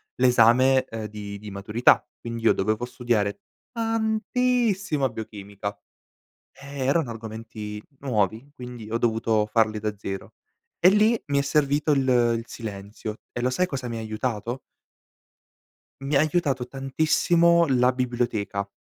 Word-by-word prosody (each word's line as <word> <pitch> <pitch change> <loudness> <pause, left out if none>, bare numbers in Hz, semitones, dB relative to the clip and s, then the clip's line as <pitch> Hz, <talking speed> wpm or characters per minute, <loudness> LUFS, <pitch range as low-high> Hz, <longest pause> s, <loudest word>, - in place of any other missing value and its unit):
l'esame, 125 +1 +5
ehm, 110 -1 -6
di 100 -1 -7
di 105 0 -9
maturità 105 +5 +3 0.2
quindi 115 -1 -6
io - - +5
dovevo 110 +4 -1
studiare 120 - -1 0.3
tantissima 220 - 0
biochimica. 100 -2 -7 0.8
Eh, 140 -1 -6
erano 140 -1 +1
argomenti 110 -1 -7 0.2
nuovi, 115 0 -1
quindi 125 -3 -9
ho 115 - +1
dovuto 110 -2 +1
farli 110 0 +2
da 105 -1 -3
zero. 95 -1 -6 0.4
E 180 - +6
lì 215 +3 +3
mi 140 -1 +1
è - - +2
servito 145 +1 +2
il 135 -2 +1 0.3
il 115 - -6
silenzio 105 0 -7
e 120 - -4
lo 125 +1 +1
sai 180 +8 +1
cosa 130 -6 -4
mi 115 - -4
aiutato? 110 +2 -3 1.4
Mi 140 +1 -1
ha - - +6
aiutato 150 -6 +1
tantissimo 165 +5 +3
la 125 -1 +3
biblioteca. 120 -5 -2
120 Hz, 130 wpm, -25 LUFS, 110-140 Hz, 1.4 s, E